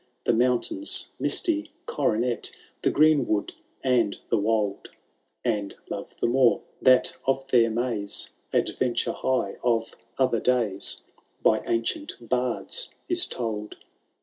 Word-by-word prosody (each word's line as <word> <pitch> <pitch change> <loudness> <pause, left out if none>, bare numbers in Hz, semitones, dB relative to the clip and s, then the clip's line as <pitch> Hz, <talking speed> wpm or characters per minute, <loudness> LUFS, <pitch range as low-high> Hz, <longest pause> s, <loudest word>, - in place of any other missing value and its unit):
The - - +3
mountain*8 125 - +1 0.2
misty^ 315 -2 +1 0.2
coronet. 120 -3 0 0.3
The - - +3
greenwood, 145 -9 +3 0.3
and 125 -6 +2
the - - +4
wold; 105 -1 0 0.6
And 100 -1 -1 0.2
love - - -6
the - - +1
more, 125 0 +4 0.2
that 130 0 +5
of 135 0 +1
their 120 -3 +5
maze 110 -3 -1 0.2
Adventure 120 -2 +1
high 130 -7 -1
of 115 -2 +1 0.2
other 130 -4 +2
days 115 -6 +1 0.4
By - - +4
ancient 115 - -1
bards 125 - -1 0.2
is 355 0 +2
told. 105 -3 -4
120 Hz, 115 wpm, -26 LUFS, 110-135 Hz, 0.6 s, that